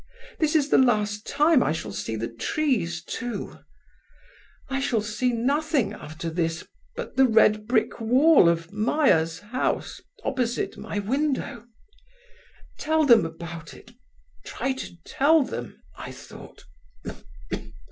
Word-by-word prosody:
This 310 -1 +1
is 295 -2 +3
the - - +5
last 210 -4 +1
time 300 -2 +4
I - - +1
shall 160 - -5
see 110 - -4
the 115 +1 -3
trees, 170 - -1
too. 240 0 -5 1.1
I 270 -1 -2
shall 240 -5 0
see 235 +4 -1
nothing 270 -1 0
after 155 -2 -7
this 165 0 -2 0.3
but - - -7
the 265 0 +6
red 215 -2 +4
brick 230 -1 +1
wall 255 - +5
of 165 +2 -2
Meyer's 205 - +2
house 235 +5 -2 0.2
opposite 250 -3 -1
my - - -6
window. 245 +1 -2 1.1
Tell 315 0 +2
them 230 -10 +6
about 165 0 -9
it—try 250 +2 -7
to 260 -9 -8
tell 305 +2 +3
them,' 120 - -7 0.2
I - - -8
thought. - - -13
235 Hz, 125 wpm, -25 LUFS, 170-270 Hz, 1.1 s, the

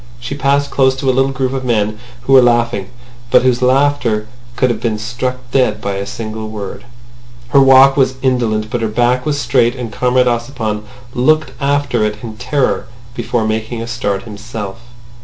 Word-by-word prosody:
She 120 +3 -5
passed 140 +1 +1
close 130 -1 +3
to 135 0 0
a - - -2
little 135 +1 +2
group 135 -1 -2
of 135 -1 -3
men 110 -3 0 0.2
who 135 - +1
were 130 - +9
laughing, 120 -5 +1 0.4
but - - +5
whose 125 -1 +2
laughter 125 -4 +2 0.3
could 125 0 +2
have 110 -2 -4
been 115 -3 -1
struck 125 +4 -3 0.2
dead 125 -6 +2
by 100 -2 -3
a 100 0 -4
single 110 -1 -6
word. 105 +1 -7 0.6
Her 140 +2 +5
walk 135 0 +7
was 130 -2 +2
indolent, 110 -4 0
but 120 -2 -1
her 115 - 0
back 120 +5 +1
was 145 -1 0
straight, 120 -3 +2
and 120 -4 -6
Comrade 125 0 +2
Ossipon 115 -3 -2 0.3
looked 155 +2 +2
after 140 -4 +1
it 105 +1 -2
in 110 -2 -7
terror 125 +3 -1 0.3
before 120 -1 -1
making 110 +2 -2
a 115 - -4
start 105 -4 -2
himself. 105 -1 -7
120 Hz, 180 wpm, -16 LUFS, 110-130 Hz, 0.6 s, were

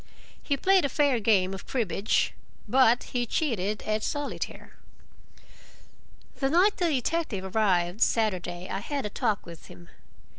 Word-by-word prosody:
He 280 - -1
played 380 +4 +4
a 280 - +1
fair 280 -3 +2
game 195 -4 +2
of 190 - -8
cribbage, 210 -5 0 0.3
but 250 -2 +4
he 245 -1 0
cheated 215 - -1
at 215 0 -1
solitaire. 290 +5 -4 1.6
The 270 - 0
night 365 +7 +3
the 350 - +1
detective 250 - -2
arrived, 185 -2 +1
Saturday, 185 -6 0
I 195 - -3
had 280 +5 -4
a 210 - -4
talk 220 -4 -1
with 170 -1 -11
him. 85 -1 -14
220 Hz, 140 wpm, -27 LUFS, 190-280 Hz, 1.6 s, played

